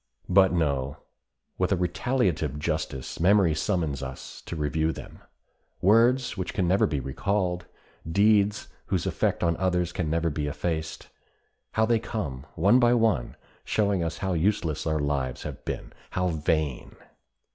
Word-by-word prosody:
But 95 +1 +5
no, 70 -5 0 0.6
with 90 +1 +1
a - - +4
retaliative 90 - 0
justice 75 -4 -3
memory 95 -1 +4
summons 80 -5 -1
us 65 -1 -8
to - - -4
review 80 +1 0
them! - - -10 0.6
Words 115 +6 +4
which 95 - -4
can 90 - +1
never 95 +3 +3
be 75 - -1
recalled, 90 - -1 0.4
deeds 105 +2 +3 0.2
whose - - 0
effect - - 0
on 85 -1 +2
others 90 -2 0
can 85 -3 -2
never 85 +1 0
be 75 0 -2
effaced, 80 +2 -3 0.6
how 110 - +3
they 115 0 +2
come, 75 - -5
one 100 +9 +5
by 120 0 +4
one, 110 - +1 0.3
showing 100 -4 +1
us 85 0 -3
how 95 +1 -1
useless 85 -3 0
our 80 0 +1
lives 70 -4 -2
have 70 -3 -7
been—how 90 0 -4
vain! 75 -4 -1
85 Hz, 145 wpm, -27 LUFS, 75-100 Hz, 0.6 s, But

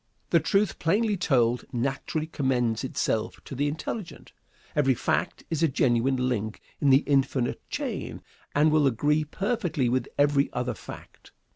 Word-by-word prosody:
The - - +6
truth, 200 -2 +1
plainly 210 +6 +2
told, 125 -9 +2
naturally 135 +5 -2
commends 125 -7 0
itself 110 -4 -1
to - - -8
the 140 +3 0
intelligent. 165 +6 -5 0.4
Every 135 -3 +3
fact 145 +8 -1
is 160 -1 -1
a 165 - +5
genuine 125 -1 +1
link 110 -3 -2 0.2
in 145 - +3
the 135 +2 +6
infinite 135 -3 +1
chain, - - -4 0.3
and 150 +2 +4
will 150 -2 +4
agree 145 +5 +2
perfectly 175 - -1
with 125 0 0
every 145 -1 +3
other 125 0 -1
fact. - - -12
140 Hz, 145 wpm, -27 LUFS, 125-155 Hz, 0.4 s, The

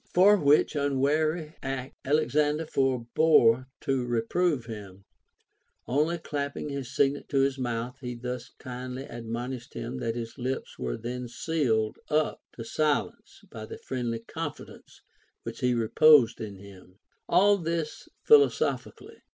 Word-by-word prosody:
For 195 +4 +7
which 150 -4 +3
unwary 150 +3 0
act 135 -1 -4
Alexander 150 +2 +1
forbore 130 -2 +3
to 135 -2 0
reprove 125 +5 0
him; 100 -4 -9 0.8
only 150 +7 +1
clapping 145 -2 -4
his 140 -3 -5
signet 140 +1 +1
to 135 -2 +2
his 135 0 +1
mouth, 120 +1 -3
he 125 -2 -5
thus 125 0 -5
kindly 125 +1 -6
admon 120 +1 -5
ished 120 -1 -9
him 65 - -5
that 115 - -2
his 115 +2 -6
lips 130 +2 -4
were - - -3
then 125 +2 -5
sealed 120 -5 -1
up 155 0 +1
to 115 - -6
silence 150 +4 -1
by 110 -1 -8
the - - -8
friendly 120 -3 -3
confidence 115 - -8 0.4
which - - -7
he 125 -1 +2
reposed 120 +1 +5
in 105 -2 -6
him, 95 -1 -15 0.2
— - - -44
all 200 +2 +5
this 165 -2 -3
philosophically. 440 -2 +2
130 Hz, 135 wpm, -28 LUFS, 115-150 Hz, 0.8 s, For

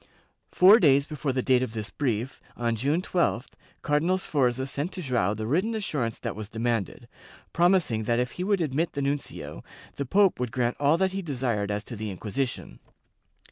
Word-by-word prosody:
Four 195 +5 +7
days 140 -3 +4
before 150 -2 -3
the 130 -1 -1
date 130 -2 +3
of 130 -4 -3
this 110 -2 -5
brief, 125 -2 -2 0.2
on 115 -1 0
June 145 +10 0
12th, 170 -10 0 0.3
Cardinal 160 +6 +2
Sforza 130 -7 0
sent 145 +6 -3
to 185 - -5
Joao 120 -7 0
the 110 +1 -4
written 185 - 0
assurance 145 - -2
that - - -5
was 105 -1 -7
demanded, 115 -3 -2 0.5
promising 170 - +2
that 115 +1 +1
if 125 -1 0
he 180 - -5
would 200 -1 +1
admit 155 +2 -1
the 140 - -2
nuncio, 140 +1 -4 0.3
the 140 - -2
pope 195 +1 +3
would 125 -2 -2
grant 120 -1 0
all 145 +3 +3
that 190 +1 +1
he 195 +1 -3
desired 125 - -2
as 105 0 -2
to 120 - -7
the 110 0 -4
Inquisition. 110 +7 -4
135 Hz, 185 wpm, -26 LUFS, 115-165 Hz, 0.5 s, Four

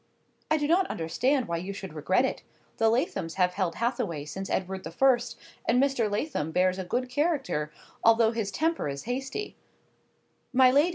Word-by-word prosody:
"I 310 - +3
do 295 -1 0
not 365 +4 +3
understand 250 - 0
why 170 0 -1
you 185 +4 -5
should 190 -4 -7
regret 185 - +2
it. - - -3 0.4
The 225 - +4
Lathoms 230 - -1
have 180 -1 +2
held 180 -4 -1
Hathaway 235 - -2
since 190 +6 -6
Edward 190 0 -2
the 160 - -5
First, 245 +6 +2 0.3
and 245 +2 +4
Mr. 270 -5 +2
Lathom 205 - -2
bears 185 +2 +2
a - - -2
good 245 +8 -1
character, 270 - -1 0.3
although 225 0 +5
his 225 -3 -2
temper 320 - 0
is 140 0 -5
hasty—" 270 - -4 1.0
"My 255 -1 +6
lady! 290 +6 +4
225 Hz, 175 wpm, -28 LUFS, 180-270 Hz, 1.0 s, My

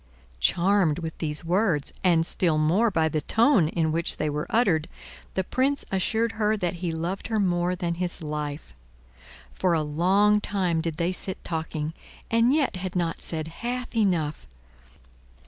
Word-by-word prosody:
Charmed 175 - +3
with 165 -2 -5
these 155 0 -3
words, 175 -4 +1
and 170 -3 +4
still 165 -2 +1
more 175 +10 +3
by 160 -5 +1
the 155 -1 -1
tone 220 - +3
in 160 -1 0
which 165 +1 -1
they 155 -1 -1
were 150 +1 -3
uttered, 185 -9 +2 0.5
the 190 - +1
Prince 270 +8 0
assured 220 +4 +1
her 215 -1 0
that 180 -3 -2
he 175 -2 -1
loved 170 +4 -3
her 220 -1 0
more 180 -2 +1
than 175 -1 -2
his 175 0 -3
life. 150 -1 -5 0.8
For 180 - +1
a 160 -2 +1
long 190 +8 +3
time 180 -6 0
did 160 -2 -3
they 175 +1 0
sit 185 0 -4
talking, 160 -1 -3 0.4
and 230 +2 +4
yet 285 -9 +1
had 185 0 -5
not 170 -2 -1
said 160 -1 -2
half 245 +1 -4
enough. 175 -9 0
175 Hz, 165 wpm, -26 LUFS, 160-205 Hz, 0.8 s, and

